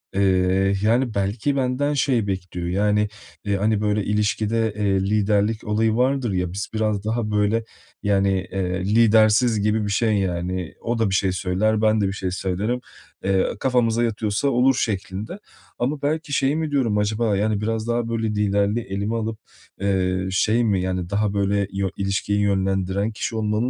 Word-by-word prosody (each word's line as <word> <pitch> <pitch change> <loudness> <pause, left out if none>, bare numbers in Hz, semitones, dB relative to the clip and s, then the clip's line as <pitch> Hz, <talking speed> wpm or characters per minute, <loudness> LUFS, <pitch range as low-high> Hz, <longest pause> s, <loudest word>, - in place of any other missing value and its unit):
Eee, 95 0 +2
yani, 120 +2 +2
belki 105 +8 -1
benden 135 +2 0
şey 130 -6 +1
bekliyor. 90 -2 -4
Yani, 105 +3 +1 0.5
hani, 105 +1 +1
böyle, 105 0 +1
ilişkide, 105 +1 0
eee, 100 -2 +1
liderlik 105 +2 +1
olayı 110 +1 +1
vardır 130 -1 +1
ya, 90 -2 -1
biz 100 +2 -4
biraz 110 -2 0
daha 110 -1 -1
böyle, 105 +2 +1 0.4
yani, 100 -1 +2 0.2
eee, 90 -1 -2
lidersiz 110 0 +4
gibi 105 +1 +1
bir 100 - -2
şey, 110 +1 +2
yani. 90 -2 -2
O 120 0 -2
da 110 -3 +2
bir 95 - 0
şey 95 -1 +2
söyler, 95 +4 0
ben 110 -1 +3
de 100 - +2
bir 95 - -2
şey 95 -2 -3
söylerim. 95 +6 -2 0.4
Eee, 95 -1 +2
"Kafamıza 120 -3 +2
yatıyorsa 110 +2 -1
olur." 130 0 +3
şeklinde. 105 - -3 0.4
Ama, 140 +4 -1
belki 150 +1 -2
şey 135 +1 +2
mi, 160 -1 -2
diyorum. 125 -7 +1
Acaba, 105 0 +1
yani, 105 0 0
biraz 110 +1 -2
daha 120 0 0
böyle 115 -1 -1
liderliği 105 +1 0
elime 100 +3 -2
alıp, 110 -1 -3 0.4
eee, 95 -1 0
şey 110 +5 +2
mi, 100 -5 +1
yani, 90 -1 -2
daha 100 +1 0
böyle 100 0 +1
yö 95 0 -1
ilişkiyi 100 +1 -1
yönlendiren 95 0 0
kişi 110 +1 -4
olmamı 110 +2 0
105 Hz, 165 wpm, -22 LUFS, 95-115 Hz, 0.5 s, lidersiz